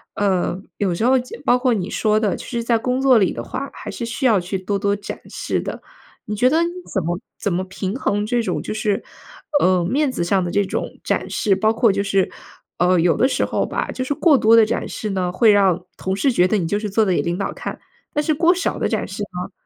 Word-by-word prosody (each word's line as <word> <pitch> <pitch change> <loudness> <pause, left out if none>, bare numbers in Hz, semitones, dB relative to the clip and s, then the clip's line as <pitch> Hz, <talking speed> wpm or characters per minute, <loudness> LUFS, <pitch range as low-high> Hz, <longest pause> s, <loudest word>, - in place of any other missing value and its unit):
呃， 190 -2 0 0.2
有 190 -4 0
时 220 - -1
候 260 +1 +4
就 250 - -8
包 250 -2 +4
括 250 -2 +2
你 195 -1 -3
说 215 -1 +2
的， 210 -3 0
其 - - -8
实 235 -1 -3
在 235 0 +2
工 250 +3 -1
作 265 -3 +5
里 190 - +2
的 - - -5
话， 275 0 -5
还 - - -8
是 - - -6
需 235 +4 -3
要 225 -6 +5
去 180 +2 -3
多 195 +2 -2
多 200 +1 +1
展 205 - -7
示 - - -2
的。 - - -6 0.4
你 210 - -3
觉 250 +5 +4
得 320 +3 +3
你 340 - 0 0.2
怎 190 - -1
么 175 +2 -2 0.2
怎 200 - -1
么 180 +2 0
平 190 +2 -4
衡 205 -5 0
这 240 +2 +1
种 225 - -2
就 - - -4
是， 215 0 -1 0.6
呃， 180 -2 +3
面 275 - +1
子 175 - -2
上 190 +2 +1
的 175 - -3
这 200 +2 +1
种 - - -3
展 - - -1
示， 200 -2 +1
包 215 +3 +2
括 225 -1 +3
就 200 +1 0
是 195 -1 +1 0.5
呃， 180 +1 +4
有 170 -1 +3
的 260 - +3
时 - - 0
候 - - -1
吧， - - -3
就 255 - -3
是 285 +3 -2
过 310 -2 +4
多 225 -2 +5
地 225 -1 +7
展 - - -2
示 215 -2 -4
呢， 185 -2 -1
会 215 +4 +5
让 190 -3 +3
同 190 0 -2
事 260 +8 +2
觉 180 -6 +3
得 215 - +1
你 175 -4 -1
就 205 +5 0
是 210 -1 -4
做 215 +2 +2
得 190 - +1
给 - - +2
领 170 +1 -2
导 195 - -3
看。 - - -6 0.3
但 295 - 0
是 310 - +1
过 340 +4 +3
少 370 - -2
地 - - 0
展 - - -1
示 200 +2 -7
呢， 180 -1 -5
205 Hz, 280 characters per minute, -21 LUFS, 185-245 Hz, 0.6 s, 地